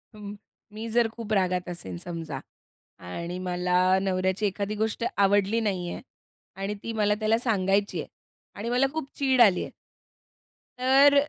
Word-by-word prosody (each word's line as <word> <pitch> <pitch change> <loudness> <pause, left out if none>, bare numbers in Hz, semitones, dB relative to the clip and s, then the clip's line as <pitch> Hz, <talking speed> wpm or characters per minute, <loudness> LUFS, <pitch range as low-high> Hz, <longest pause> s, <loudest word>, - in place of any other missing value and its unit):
म 205 -1 -7 0.4
मी 220 +2 -5
जर 235 +1 +3
खूप 225 -2 -5
रागात 180 -2 +1
असेन 95 - -6
समजा 160 - -5 0.7
आणि 170 - -4
मला 180 0 0 0.2
नवऱ्याची 190 +1 0
एखादी 200 +1 -2
गोष्ट 220 +1 -1
आवडली 200 +2 +3
नाहीये 185 -5 -2 0.5
आणि 195 +2 -3
ती 230 - -4
मला 210 -1 +2
त्याला 220 +1 +3
सांगायची 200 -4 +1
आहे - - -8 0.5
आणि 225 +3 -3
मला 250 +2 +3
खूप 315 -4 -4
चीड 265 -3 +4
आली 200 -6 +6
आहे - - -7 1.1
तर 270 +3 +6
205 Hz, 145 wpm, -27 LUFS, 185-225 Hz, 1.1 s, आली